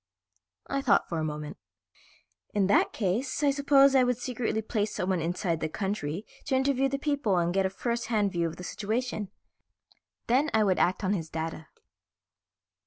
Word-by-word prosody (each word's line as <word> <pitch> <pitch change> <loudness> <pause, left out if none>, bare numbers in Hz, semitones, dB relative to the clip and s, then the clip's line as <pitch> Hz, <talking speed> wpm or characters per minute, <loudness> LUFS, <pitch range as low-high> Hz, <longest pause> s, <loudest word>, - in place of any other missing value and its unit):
I 275 0 -2
thought 255 - +3
for 165 - -2
a - - -1
minute. 150 -1 -5 1.0
"In 200 -2 +3
that 200 - +3
case 230 +8 -1
I 285 - +5
suppose 275 -1 +5
I 265 -1 +5
would 250 -1 +1
secretly 240 -3 -2
place 215 -1 -2
someone 185 -1 0
inside 170 0 -1
the 160 - -2
country 195 -1 -3 0.2
to 265 - 0
interview 270 0 +2
the 275 - -1
people 275 -9 0
and 175 0 +1
get 195 0 +2
a - - -5
first 235 +4 -3
hand 210 -4 +1
view 170 -2 0
of 165 - -6
the 180 - -9
situation. 215 +1 -3 1.0
Then 270 +6 +2
I 220 - +4
would 190 -3 +2
act 185 +3 +1
on 190 +1 +1
his 165 -5 -3
data." 160 -1 -5
210 Hz, 175 wpm, -28 LUFS, 180-255 Hz, 1.0 s, I